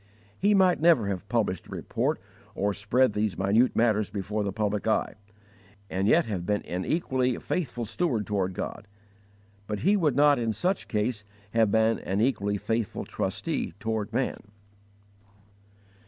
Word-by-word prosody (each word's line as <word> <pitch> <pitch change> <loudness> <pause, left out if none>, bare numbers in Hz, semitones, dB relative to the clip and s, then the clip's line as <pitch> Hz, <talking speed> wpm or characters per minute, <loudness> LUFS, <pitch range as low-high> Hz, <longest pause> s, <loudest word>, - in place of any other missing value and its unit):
He 205 +1 +4
might 185 -4 +4
never 155 -12 +4
have 100 +1 -4
published 105 -6 -1
a - - -18
report - - -2 0.4
or 100 +1 0
spread 110 +4 +2
these 105 -1 -1
minute 105 +6 +3
matters 110 -3 +2
before 105 +1 -3
the 100 - -2
public 105 0 -1
eye, 110 - +1 0.8
and 95 +2 0
yet 165 +7 +4
have 100 -6 -3
been 105 +3 -1
an 90 +1 -3
equally 130 -7 0
faithful 125 -9 -3
steward 115 - -1
toward 95 -3 -1
God; 105 - -5 0.8
but 105 -1 -3
he 200 +3 +4
would 155 -10 +2
not 145 -1 +5
in 115 -2 0
such 185 - -1
case 105 0 -1 0.3
have 115 -1 +3
been 110 +1 +3
an 95 +1 -2
equally 105 -4 +1
faithful 110 +1 -2
trustee - - -3
toward 110 -1 -2
man. 125 +3 -1
110 Hz, 155 wpm, -27 LUFS, 100-130 Hz, 0.8 s, not